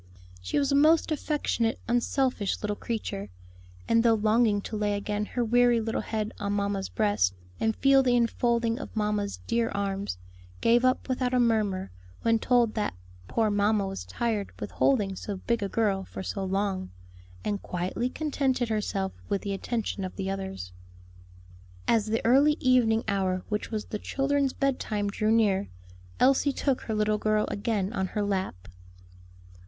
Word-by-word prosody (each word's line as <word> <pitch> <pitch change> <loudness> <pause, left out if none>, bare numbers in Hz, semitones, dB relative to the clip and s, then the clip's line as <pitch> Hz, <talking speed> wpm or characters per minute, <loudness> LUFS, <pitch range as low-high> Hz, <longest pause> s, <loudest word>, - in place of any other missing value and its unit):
She 90 - -2
was 280 -1 +2
a - - +3
most 315 +3 +4
affectionate, 285 -6 0
unselfish 245 -2 0
little 210 0 -1
creature, 205 - -4 0.6
and 230 - +4
though 230 -1 +4
longing 215 0 +3
to 215 - -6
lay 210 -1 0
again 205 +1 -2
her 245 -1 -1
weary 240 +1 +4
little 225 0 -2
head 215 -1 -3
on 200 -1 -1
mamma's 200 -1 -1
breast, 205 - +1 0.2
and 220 0 +1
feel 275 0 +5
the 250 -2 +2
enfolding 235 0 +1
of - - -8
mamma's 210 -1 -1
dear 230 0 +1
arms, 195 - -2 0.4
gave 235 +2 +4
up 255 0 +2
without 255 -1 0
a - - +4
murmur, 215 - +1 0.3
when 230 0 +3
told 240 -2 +3
that 210 - -2 0.3
"poor 220 - +1
mamma 205 0 +2
was 195 0 -5
tired 225 -4 -2
with - - -5
holding 205 -8 +2
so 205 +2 -5
big 235 +4 -1
a 200 - -1
girl 200 -4 +1
for 190 - -7
so 195 +1 -3
long," 190 - -1 0.6
and 205 -1 -1
quietly 185 +7 -2
contented 265 -4 -1
herself 200 -3 -1 0.2
with 200 -1 -1
the 200 - -2
attention 205 0 -3
of 185 - -5
the 195 -1 -2
others. 190 - -5 1.2
As 225 -2 +3
the 225 +1 -1
early 280 +6 +5
evening 240 -3 +3
hour 190 -2 0
which 210 -1 -2
was 215 -2 -3
the 210 - -5
children's 275 +1 0
bed 275 -2 0
time 205 -2 -2
drew 215 +1 0
near, 205 -3 +3 0.5
Elsie 275 +2 +4
took 270 -1 0
her 220 - -3
little 210 0 +1
girl 215 0 +2
again 205 -1 -1
on 190 -4 -1
her 210 +2 -2
lap. 190 - -2
215 Hz, 165 wpm, -27 LUFS, 200-240 Hz, 1.2 s, feel